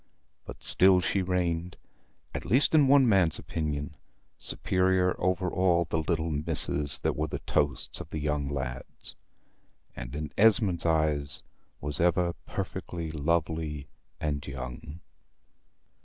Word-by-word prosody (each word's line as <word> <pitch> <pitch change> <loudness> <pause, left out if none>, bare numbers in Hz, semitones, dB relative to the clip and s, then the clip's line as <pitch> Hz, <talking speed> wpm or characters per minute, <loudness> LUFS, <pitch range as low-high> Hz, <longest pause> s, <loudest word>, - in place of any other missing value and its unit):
But - - -10
still 95 0 +5
she 95 +2 0
reigned, 90 -2 -1 0.6
at - - -4
least 130 +7 +3
in 150 -3 +6
one 135 -1 +6
man's 95 -7 +3
opinion, 75 -2 -4 0.4
superior 95 -1 +1
over 90 0 +1
all 90 -2 +2
the 80 +1 -1
little 80 0 -1
misses 75 -1 +3
that - - 0
were 80 +1 -1
the - - -4
toasts 70 -3 -1
of - - -11
the - - -5
young 75 -2 -1
lads; 65 -2 -6 0.8
and - - -7
in 75 -1 -5
Esmond's 105 -6 +3
eyes 75 -3 0 0.4
was 75 -2 -3
ever 90 0 +2
perfectly 85 -2 -5
lovely 80 -1 -2 0.3
and 75 -1 -3
young. 70 +4 -7
80 Hz, 125 wpm, -28 LUFS, 75-90 Hz, 0.8 s, in